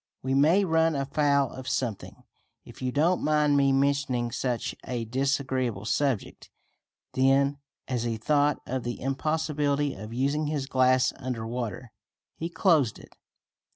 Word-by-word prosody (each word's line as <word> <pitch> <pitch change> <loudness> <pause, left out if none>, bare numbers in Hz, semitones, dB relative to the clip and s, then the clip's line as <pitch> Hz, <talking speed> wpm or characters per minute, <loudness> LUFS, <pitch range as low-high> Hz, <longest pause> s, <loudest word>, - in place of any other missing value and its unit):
"We 130 +1 -1
may 160 +9 +4
run 165 -2 +2
afoul 140 -1 +1
of 130 0 -9
something, 115 -6 -3 0.4
if - - -13
you 130 0 -1
don't 165 +7 +2
mind 150 -1 +3
me 140 -1 +4
mentioning 135 -3 +1
such 120 0 -2
a 120 -2 -3
disagreeable 130 -3 -1
subject." 135 -2 -1 0.6
Then, 140 +2 +3 0.3
as 125 -3 -1
he 115 -1 -2
thought 145 +5 +1
of 130 +1 -3
the 120 0 -5
impossibility 145 +1 -1
of 105 +2 -9
using 140 +5 0
his 145 -3 -2
glass 130 -1 +3
under 125 -4 -4
water, 120 0 -5 0.4
he 165 - -4
closed 160 - +2
it. - - -15
135 Hz, 140 wpm, -27 LUFS, 125-145 Hz, 0.6 s, may